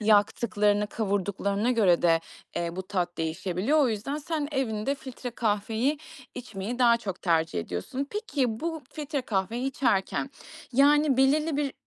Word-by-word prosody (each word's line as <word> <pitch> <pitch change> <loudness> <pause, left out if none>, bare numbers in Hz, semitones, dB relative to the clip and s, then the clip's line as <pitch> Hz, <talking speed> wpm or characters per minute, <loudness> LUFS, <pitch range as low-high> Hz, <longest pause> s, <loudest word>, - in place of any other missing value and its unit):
yaktıklarını, 210 0 +3
kavurduklarına 200 +1 -1
göre 200 -8 +4
de, 165 -1 +4 0.4
eee, 170 0 -2
bu 190 - -3
tat 180 -3 -2
değişebiliyor. 185 - 0
O 280 - +4
yüzden 225 +6 -2
sen 300 -1 -3
evinde 260 -1 0
filtre 260 -2 -7
kahveyi 225 +5 0 0.4
içmeyi 235 -1 -5
daha 235 -2 +6
çok 195 -5 -6
tercih 165 - +1
ediyorsun. 90 - -4
Peki, 270 - -1
bu 325 -2 -3
filtre 290 -3 -3
kahveyi 225 +4 -1
içerken, 245 0 0 0.4
yani, 285 +1 +5
belirli 290 +3 +3
bir, 285 -2 0
225 Hz, 135 wpm, -27 LUFS, 195-275 Hz, 0.4 s, daha